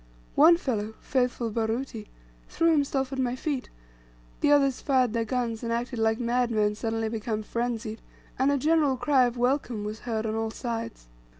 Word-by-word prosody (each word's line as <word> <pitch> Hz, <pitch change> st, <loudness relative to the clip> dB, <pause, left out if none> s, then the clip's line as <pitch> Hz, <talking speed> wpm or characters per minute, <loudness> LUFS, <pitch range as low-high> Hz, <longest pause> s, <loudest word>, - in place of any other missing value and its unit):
One 330 Hz, +3 st, +7 dB
fellow, 220 Hz, -, -3 dB
faithful 245 Hz, -3 st, -1 dB
Baruti, 225 Hz, 0 st, -2 dB, 0.4 s
threw 330 Hz, 0 st, +2 dB
himself 275 Hz, -3 st, 0 dB
at 265 Hz, -, -3 dB
my 250 Hz, -1 st, 0 dB
feet, 270 Hz, -1 st, -3 dB, 0.7 s
the 290 Hz, -, +3 dB
others 275 Hz, -3 st, +3 dB
fired 255 Hz, -5 st, +2 dB
their 230 Hz, -1 st, 0 dB
guns 230 Hz, -1 st, -2 dB
and 230 Hz, -, -3 dB
acted 240 Hz, +1 st, -2 dB
like 225 Hz, +1 st, +2 dB
madmen 235 Hz, -3 st, +1 dB
suddenly 225 Hz, +1 st, -2 dB
become 220 Hz, -1 st, -3 dB
frenzied, 230 Hz, -1 st, -3 dB, 0.4 s
and 270 Hz, +2 st, +3 dB
a 285 Hz, -, +2 dB
general 295 Hz, -1 st, +2 dB
cry 255 Hz, +1 st, +3 dB
of 245 Hz, 0 st, -2 dB
"welcome" 245 Hz, -3 st, 0 dB
was 210 Hz, +1 st, -5 dB
heard 225 Hz, -2 st, -3 dB
on 215 Hz, -, -1 dB
all 225 Hz, 0 st, -1 dB
sides. 230 Hz, -1 st, -5 dB
240 Hz, 170 wpm, -27 LUFS, 225-265 Hz, 0.7 s, One